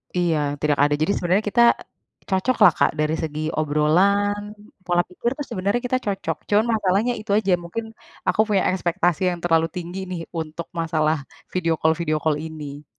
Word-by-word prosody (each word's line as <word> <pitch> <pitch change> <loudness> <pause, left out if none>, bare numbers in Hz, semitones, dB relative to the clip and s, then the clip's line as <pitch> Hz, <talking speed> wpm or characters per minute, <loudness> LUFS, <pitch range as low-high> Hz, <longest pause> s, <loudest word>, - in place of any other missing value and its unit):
Iya, 170 -3 +2 0.2
tidak 150 -1 +2
ada. 145 0 +3
Jadi 160 - +2
sebenarnya 185 +4 +1
kita 235 +3 +4 0.7
cocok 195 +7 +1
lah 180 - +9
Kak - - +4
dari 155 +1 +1
segi 155 -1 -4 0.2
obrolan, 185 +8 +2 0.4
pola 175 -1 +1
pikir 235 +6 -2
tuh 290 - -4
sebenarnya 200 +2 -1
kita 255 +1 +1
cocok. 195 -2 -2
Cuman 210 +2 +4
masalahnya 210 +3 +1
itu 215 -1 -6
aja, 200 -3 +1
mungkin 220 +7 -5 0.4
aku - - +1
punya 200 -3 +2
ekspektasi 180 -1 0
yang 175 - -5
terlalu 165 -1 +3
tinggi 180 +1 -5
nih 175 -2 -4 0.2
untuk 160 +1 -6
masalah 160 -1 +1 0.4
video 165 -3 +1
call 160 0 +3
video 155 -2 0
call 155 -2 +2
ini. 150 -2 -7
175 Hz, 170 wpm, -22 LUFS, 160-200 Hz, 0.7 s, lah